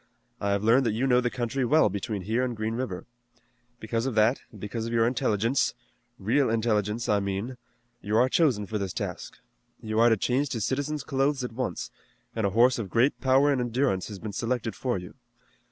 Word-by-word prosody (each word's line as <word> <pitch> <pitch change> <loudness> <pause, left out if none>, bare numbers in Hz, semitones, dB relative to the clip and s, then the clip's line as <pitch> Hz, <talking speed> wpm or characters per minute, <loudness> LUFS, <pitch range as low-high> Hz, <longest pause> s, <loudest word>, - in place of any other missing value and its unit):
I 100 - -1
have 100 0 0
learned 120 +3 +4
that 110 - +1
you 120 +5 0
know 125 -2 +4
the 120 - 0
country 120 +2 -2
well 155 +4 +4
between 100 0 -3
here 115 +6 0
and 125 -3 -3
Green 110 +1 -2
River. 115 -7 -4 0.7
Because 115 +3 -2
of 130 - -3
that, 110 +4 +3
and 105 - -13
because 110 +3 -4
of - - -5
your 115 -1 +3
intelligence, 120 0 +1 0.4
real 120 +7 +1
intelligence, 110 0 0
I 105 - +3
mean, 100 +6 -3 0.5
you 105 +2 0
are 125 - +5
chosen 130 -8 +2
for 105 +2 -3
this 95 -3 -3
task. - - -5 0.4
You 110 0 -2
are 120 +1 +6
to 115 - +3
change 130 +7 0
to 115 - -2
citizen's 145 +5 -2
clothes 135 0 0
at 125 - -4
once, 120 -8 -4 0.4
and 110 -3 +1
a 100 +3 -4
horse 125 +1 +5
of 105 -4 -4
great 120 +8 +2
power 135 +2 +4
and 135 -3 +1
endurance 120 -5 0
has 105 - -7
been 105 +1 -7
selected 115 -1 -2
for 125 -5 -1
you. 90 -1 -9
115 Hz, 205 wpm, -27 LUFS, 105-130 Hz, 0.7 s, are